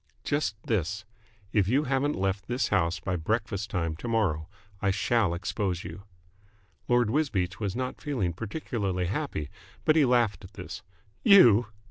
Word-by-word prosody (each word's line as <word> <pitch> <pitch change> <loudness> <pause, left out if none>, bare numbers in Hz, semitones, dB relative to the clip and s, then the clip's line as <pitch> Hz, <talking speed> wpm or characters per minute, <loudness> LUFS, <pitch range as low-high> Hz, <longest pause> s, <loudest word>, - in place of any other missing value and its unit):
"Just 145 -6 0
this. 105 +1 -1 0.5
If 100 -4 +3
you 135 +7 +3
haven't 140 +1 0
left 95 0 -1
this 125 +2 0
house 85 -4 +1
by 90 +3 -2
breakfast 100 +3 -2
time 85 -4 -1
to 120 - -6
morrow, 95 -9 0 0.3
I 100 - +2
shall 100 -1 +1
expose 90 0 -2
you." 95 +5 -9 0.8
Lord 120 -3 +3
Wisbeach 105 - 0
was 100 -3 -2
not 130 +1 -4
feeling 120 - -1
particularly 100 - -3
happy, 95 - -3 0.3
but 155 - +5
he 155 - +5
laughed 120 -7 +2
at 95 +2 -12
this. 110 - -7 0.4
"You!" 120 - +7
105 Hz, 150 wpm, -28 LUFS, 90-120 Hz, 0.8 s, You